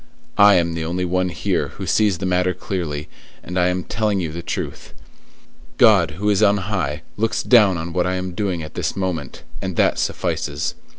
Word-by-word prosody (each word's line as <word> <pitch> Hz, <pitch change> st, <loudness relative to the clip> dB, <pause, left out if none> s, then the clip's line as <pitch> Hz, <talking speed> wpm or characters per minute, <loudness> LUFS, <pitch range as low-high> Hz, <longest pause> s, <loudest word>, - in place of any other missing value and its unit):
I 100 Hz, -1 st, +8 dB
am 85 Hz, -1 st, +2 dB
the 80 Hz, -1 st, -3 dB
only 90 Hz, +3 st, -2 dB
one 90 Hz, +1 st, 0 dB
here -, -, -1 dB
who -, -, -5 dB
sees 105 Hz, -5 st, +2 dB
the 95 Hz, -, -4 dB
matter 90 Hz, 0 st, +1 dB
clearly, 85 Hz, -6 st, -4 dB, 0.4 s
and 90 Hz, -, -7 dB
I 90 Hz, -, +3 dB
am 90 Hz, 0 st, -1 dB
telling 105 Hz, -2 st, -1 dB
you 85 Hz, -4 st, -3 dB
the 85 Hz, +2 st, -6 dB
truth. -, -, -5 dB, 0.8 s
God, 75 Hz, -, +5 dB
who 105 Hz, +2 st, -2 dB
is 100 Hz, 0 st, +2 dB
on 100 Hz, -1 st, +5 dB
high, 90 Hz, -7 st, -2 dB
looks 110 Hz, +1 st, 0 dB
down 105 Hz, -7 st, +5 dB
on 85 Hz, +1 st, -5 dB
what 90 Hz, +1 st, +1 dB
I 90 Hz, -, 0 dB
am 90 Hz, -1 st, -4 dB
doing 95 Hz, -4 st, -2 dB
at 75 Hz, -, -9 dB
this -, -, -2 dB
moment, 90 Hz, -7 st, -4 dB, 0.2 s
and 95 Hz, -2 st, -4 dB
that -, -, +2 dB
suffices. -, -, -2 dB
90 Hz, 195 wpm, -21 LUFS, 85-100 Hz, 0.8 s, I